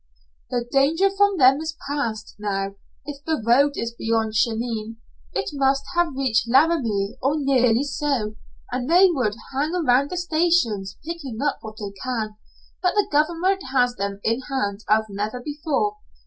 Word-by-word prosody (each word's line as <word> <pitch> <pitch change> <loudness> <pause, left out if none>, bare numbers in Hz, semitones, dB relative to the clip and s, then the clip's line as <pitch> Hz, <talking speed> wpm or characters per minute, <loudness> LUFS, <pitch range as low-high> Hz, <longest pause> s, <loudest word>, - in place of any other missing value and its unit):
"The 240 -1 -2
danger 320 +8 +3
from 405 0 +2
them 265 -1 +6
is 315 0 -5
past, 235 -7 -3
now. 195 -1 -2 0.3
If 285 -1 -8
the 320 -1 -1
road 275 +5 +4
is 230 0 -3
beyond 225 -1 -1
Cheyenne, 225 0 -1 0.3
it - - -2
must 275 0 +2
have 345 -5 +1
reached 255 -4 +1
Laramie 250 -8 +2
or 275 +3 +1
nearly 255 -4 +3
so, 275 -7 -1 0.4
and 250 +2 -2
they 360 +2 +6
would 245 -10 0 0.2
hang 300 +6 0
around 280 -5 +3
the 360 - -4
stations, 315 - +1
picking 300 -9 -6
up 290 - 0
what 215 0 -9
they 200 -2 -6
can, 225 -5 -3 0.5
but 360 +1 +1
the 415 - +2
government 340 +6 +2
has 245 -2 +3
them 200 -1 -3
in 230 +3 +1
hand 205 -6 -2
as 220 +1 +4
never 210 +4 -4
before. 305 +9 -2
265 Hz, 160 wpm, -23 LUFS, 220-310 Hz, 0.5 s, them